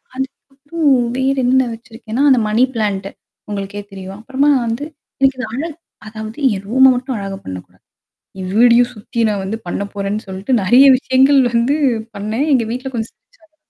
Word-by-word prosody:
அதுக்கப்புறம் 280 +3 -3 0.3
வேறென்ன 260 -1 +2
வச்சிருக்கேன்னா, 230 +2 -5
அந்த 255 -3 +5
மணி 225 +4 +3
பிளான்ட். 200 -3 -1 0.4
உங்களுக்கே 200 0 -5
தெரியும். 195 0 -8
அப்புறமா 270 +4 +1 0.2
வந்து 230 +5 -3 0.4
எனக்கு 270 -1 +3
இந்த - - -3
அழகு 310 +2 -4 0.3
அதாவது 220 +2 -8 0.2
என் 195 +1 -7
ரூம 265 +2 +6
மட்டும் 255 0 -3
அழகா 195 -1 -5
பண்ணக்கூடாது. 90 -1 -9 0.6
என் 185 0 -5
வீடயும் 240 +1 +5
சுத்தி 230 +3 -7
நான் 200 -2 -2
வந்து 210 +4 -3
பண்ண 185 - -3
போறேன்னு 205 +2 -3
சொல்லிட்டு 190 +7 -3
நெறைய 245 +8 +6
விஷயங்கள் 270 +1 +3
வந்து 240 +5 +2 0.4
பண்ணேன். 215 +8 -2
எங்க 245 -3 +3
வீட்ல 255 +2 -5
கொஞ்சம் 225 -1 -4
சிரிச்சாங்க. 325 -11 -31
235 Hz, 155 wpm, -17 LUFS, 205-265 Hz, 0.6 s, ரூம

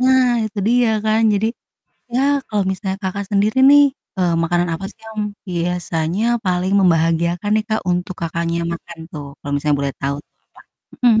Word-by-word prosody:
Nah 260 0 +5 0.2
itu 210 0 -8
dia 240 0 +3 0.2
kan 220 +1 +2
jadi 205 +2 +1 0.7
ya 255 - +2 0.3
kalau 205 -2 0
misalnya, 190 0 -3
Kakak, 200 +2 -3
sendiri 205 +4 +2
nih, 290 0 +8 0.4
eee, 175 -2 +2
makanan 175 +1 +1
apa 165 +4 -6
sih - - -29
yang 220 -1 -6 0.3
biasanya 175 +1 -1 0.2
paling 185 +1 +1
membahagiakan 170 +1 +2
nih, 215 - +1
Kak, 220 - 0
untuk 180 +1 -2
Kakaknya 170 +1 -1
makan 170 0 -9
tuh 145 -2 -7
kalau 145 - -6
misalnya 145 0 +1
boleh 140 -1 -1
tahu 140 +1 -1
tuh, - - -55 0.5
Kak? - - -20
Mhm. 220 -1 +5
180 Hz, 170 wpm, -19 LUFS, 170-215 Hz, 0.7 s, nih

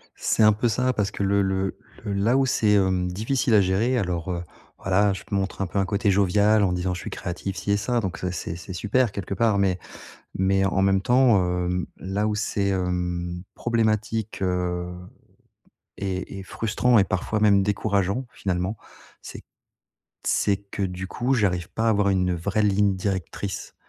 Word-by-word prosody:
C'est 110 - +1
un 105 0 +7
peu 120 +3 0
ça, 125 +3 +1
parce 105 -2 -1
que 100 - -3
le 100 +1 +2
le 95 0 -1 0.3
le 100 - -3
là 110 +7 +2
où 135 - +3
c'est, 110 -5 +2
hem, 95 -2 +2
difficile 115 +5 0
à 105 - +7
gérer, 100 +7 +1
alors, 90 -4 -2
heu, 85 0 -3 0.3
voilà, 100 +1 +2
je - - -7
montre 100 0 -1
un 95 - 0
peu 100 - -2
un 95 - +2
côté 100 +1 +1
jovial 100 +2 +3
en 90 - +2
disant: 90 +1 -1
«Je 90 - -5
suis - - -6
créatif, 95 +2 -5
ci 100 - -2
et 100 - +3
ça», 120 +4 0
donc 95 -3 -3
ça 90 -1 -3
c'est 85 -1 -5
c'est 90 +2 -8
super 110 +5 +1
quelque 100 -1 -5
part, 110 -1 +2
mais 95 -2 +1 0.6
mais 95 +1 +2
en 95 0 +1
même 95 0 +3
temps, 125 -1 +4 0.3
hem, 90 0 -1
là 100 +3 -2
où 105 - 0
c'est, 100 -2 -1
hem, 90 -2 -2
problématique, 110 -2 -1
heu, 90 -1 -1 1.0
et 95 0 -4
et - - -6
frustrant 115 +4 +1
et 100 - +5
parfois 95 +3 -2
même 100 -2 +5
décourageant, 100 +3 0
finalement, 95 +2 -2 0.5
c'est - - -10 0.8
c'est 100 -1 +2
que, 100 0 -7
du 90 0 -3
coup, 125 +7 -1
j'arrive 90 -6 0
pas 115 - -1
à - - +4
avoir 105 -2 +2
une 90 -2 +1
vraie 100 +5 -1
ligne 100 -1 +2
directrice 95 +1 -4
100 Hz, 185 wpm, -24 LUFS, 95-105 Hz, 1.0 s, un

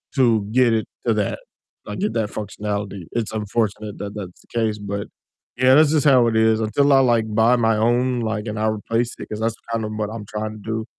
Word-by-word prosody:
to 115 -6 +3
get 125 -1 +4
it 110 -2 0 0.2
to 115 - +4
that, 105 -2 -1 0.5
like 105 0 -6
get 110 +1 -1
that 110 -3 -1
functionality. 105 -2 -4
It's 115 -2 -2
unfortunate 105 -1 -2
that 100 0 -6
that's 95 -4 -8
the - - -26
case, 110 -2 0
but 100 0 -5 0.5
yeah, 130 +1 +5
that's 155 0 +5
just 155 -2 +2
how 130 -4 +6
it 110 - 0
is, 110 0 +3
until 125 +7 +2
I 135 - +6
like 120 -4 +3
buy 115 +3 +4
my 115 -2 +2
own, 120 +2 +2
like, 110 0 -3
and 105 0 -4
I 110 - +1
replace 115 +2 -1
it, - - -7
'cause 105 - -5
that's 115 0 0 0.2
kind 115 -1 -1
of 105 - -5
what 105 -1 -2
I'm 110 -2 -7
trying 110 +1 -4
to - - -12
do, 110 +1 -3
110 Hz, 230 wpm, -21 LUFS, 105-120 Hz, 0.5 s, how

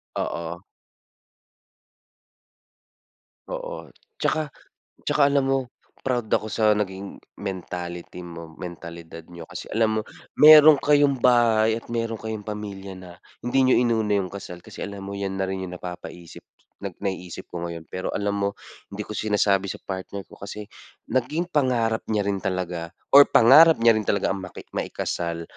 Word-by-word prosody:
Oo. - - -3 2.9
Oo. - - -6 0.3
'Tsaka 155 -1 0 0.5
tsaka 150 - +1
alam 140 -1 +2
mo, 135 - +3 0.4
proud 120 -4 -2
ako 110 - +2
sa 110 0 +2
naging, 100 -2 -3 0.2
mentality 90 -2 -6
mo, 85 -2 -10
mentalidad 85 -2 -9
niyo. 85 -1 -10
Kasi - - -7
alam 110 0 +2
mo, - - -1 0.4
meron 150 0 +9
kayong 145 -3 +3
bahay 115 -3 +4
at 115 - -8
meron 115 -1 -1
kayong 110 -2 -6
pamilya 100 -2 -6
na, 90 -1 -11 0.3
hindi 130 +2 +2
niyo 130 - +5
inuna 110 -3 +1
'yong 95 -2 -1
kasal. 90 -3 -8
Kasi - - -12
alam 100 0 -7
mo, 100 - -6
'yan 100 -1 -3
na 95 - -1
rin 95 0 -3
'yong 90 - -7
napapaisip 90 -1 -9 0.4
nag 100 -3 -6
naiisip 95 -3 -4
ko 85 0 -4
ngayon. 85 -1 -7
Pero 95 - -4
alam 100 0 0
mo, 100 0 +1 0.4
hindi 100 +1 -6
ko - - -10
sinasabi 105 -2 +1
sa - - -6
partner 95 +1 -6
ko - - -17
kasi, 105 +1 -7 0.5
naging 150 +8 -1
pangarap 120 -6 +1
niya 105 -2 0
rin 100 -1 -1
talaga 90 -3 -3 0.2
or 140 +1 +9
pangarap 155 +8 +8
niya 115 - +8
rin 105 - -6
talaga 100 -1 +1
ang 95 - -3
maki 95 -1 -9
maikasal, 85 -1 -3
100 Hz, 155 wpm, -24 LUFS, 95-115 Hz, 2.9 s, meron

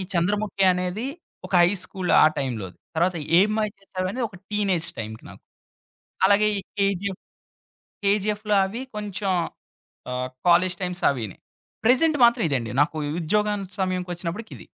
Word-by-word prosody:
ఈ - - -3
చంద్రముఖి 195 +3 +1
అనేది 180 +7 -2 0.4
ఒక - - -14
హై 175 - +5
స్కూల్ 185 -2 -4
ఆ - - +8
టైంలోది. 110 -9 -4 0.2
తరువాత 175 +2 +2 0.2
'ఏం 205 +3 +4
మాయ 215 -1 0
చేసావే' 185 -1 -4
అనేది 250 0 -2
ఒక 190 - -14
టీనేజ్ 195 -5 0
టైంకి 110 0 -6
నాకు. - - -15 0.9
అలాగే 205 +1 +4
ఈ - - -1 0.2
'కేజీఎఫ్', 195 -1 0 0.8
'కేజీఎఫ్‌లో' 210 +1 +1
అవి 230 +7 -5
కొంచెం 205 -1 -3 0.8
ఆహ్, 125 0 -2 0.2
కాలేజి 180 +1 +4
టైమ్స్ 180 -1 -2
అవీని. 115 -8 -4 0.5
ప్రెజెంట్ 295 +6 +4
మాత్రం 235 0 +4
ఇదండి. 120 -6 -1
నాకు 150 - -1 0.3
ఉద్యోగం 210 +4 +1 0.2
సమయంకొచ్చినప్పటికి 180 +2 -3
ఇది. - - -13
190 Hz, 140 wpm, -24 LUFS, 175-210 Hz, 0.9 s, ఆ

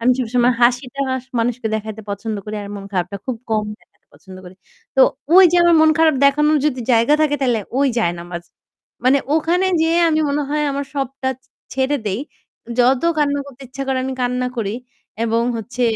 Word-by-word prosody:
আমি 250 +2 +4
সবসময় 245 0 +2
হাসিটা 250 +3 +1 0.2
স - - -30
মানুষকে 230 0 -1
দেখাইতে 220 0 -5
পছন্দ 215 +2 -4
করি 215 0 -6
আর 200 - -8
মন 195 - -8
খারাপটা 185 +2 -2
খুব 255 - -2
কম 215 -1 +1 0.2
দেখাতে - - -33
পছন্দ 190 -1 -14
করি। 180 +1 -12 0.4
তো - - +5 0.3
ঐ - - +6 0.2
যে 355 - +4
আমার 345 -1 +5
মন 315 0 +6
খারাপ 320 -2 +4
দেখানোর 300 +2 +4
যদি 260 -4 -1
জায়গা 230 +6 +4
থাকে 295 -1 +2
তাহলে 240 -4 +1 0.2
ওই 280 - +3
জায়নামাজ। 175 -3 -3 0.6
মানে 270 +2 +5 0.2
ওখানে 345 +4 +1
যেয়ে 330 +1 +2
আমি 315 -1 +1
মনে 290 +1 0
হয় 300 0 0
আমার 280 +1 -3
সবটা 270 -1 -3
ছে 265 - -34 0.2
ছেড়ে 265 +2 0
দেই। 200 +5 -1 0.6
যত 250 +1 +3 0.2
কান্না 285 -1 +1
করতে 275 -1 -13
ইচ্ছা 275 +1 -6
করে 265 -1 0
আমি 265 - -3
কান্না 250 0 0
করি। 205 -3 -2 0.5
এবং 230 0 +1
হচ্ছে 245 +3 -5
255 Hz, 190 wpm, -19 LUFS, 225-285 Hz, 0.6 s, ঐ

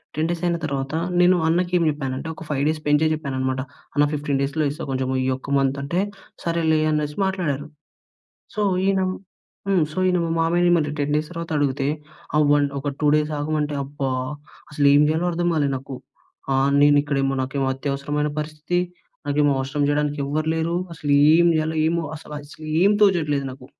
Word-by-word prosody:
10 155 +2 0
days 170 0 -3
అయిన 170 -1 +1
తర్వాత 135 -1 -3 0.3
నేను 180 +1 +6
అన్నకి 175 +2 +1
ఏం 170 - +1
చెప్పానంటే 135 0 -4
ఒక - - -9
5 140 -2 0
డేస్ 155 0 -1
పెంచే 150 +2 +4
చెప్పానన్నమాట. 130 -3 -2 0.3
అన్న 145 0 +4
15 145 -2 -1
డేస్‌లో 145 +3 0
ఇస్తా, 155 +3 -7
కొంచెం 130 0 -1 0.2
ఈ - - 0
ఒక్క 130 - -11
మంత్ 135 0 +1
అంటే 170 +6 -1 0.4
సరేలే 165 -2 +1
అనేసి 150 +1 -1
మాట్లాడారు. 155 -7 -2 0.9
సో, 210 - -1 0.3
ఈయన 195 -1 +2 0.7
హ్మ్. 190 -4 +3
సో, - - -12
ఈయన 180 -1 +2
మా 165 - -2
మామయ్యని 170 -2 +2
10 145 +1 -1
డేస్ 155 0 -3
తరువాత 170 -1 -6
అడిగితే 140 -1 0 0.5
ఆహ్, 150 - +4
1 145 -1 +3
ఒక 145 +1 -2
2 150 - +4
డేస్ 150 0 -1
ఆగమంటే 150 0 -1
అబ్బా! 140 -1 -3 0.6
అసలేం 145 0 +5
చేయాలో 160 +3 0
అర్థం 175 +1 0
కాలేదు 145 -3 +1
నాకు. 135 +1 -8 0.6
ఆహ్, 135 +1 +2
నేను 145 0 +6
ఇక్కడేమో 135 -2 0
నాకు 135 +1 -2
అత్యవసరమైన 140 +2 -2
పరిస్థితి. 155 +3 -2 0.5
నాకేమో 145 0 +2
అవసరం 135 +2 -1
చేయడానికి 145 0 0
ఎవ్వరు 155 +3 -2
లేరు. 165 +1 -1 0.2
అసలు 150 -2 -3 0.2
ఏం 170 +1 +5
చేయాలో 155 0 -1
ఏమో. 170 +1 0
అస 155 - -11 0.2
అసలేం 155 +6 0
తోచట్లేదు 155 -8 +3
నాకు. 130 0 -12
150 Hz, 170 wpm, -22 LUFS, 140-160 Hz, 0.9 s, నేను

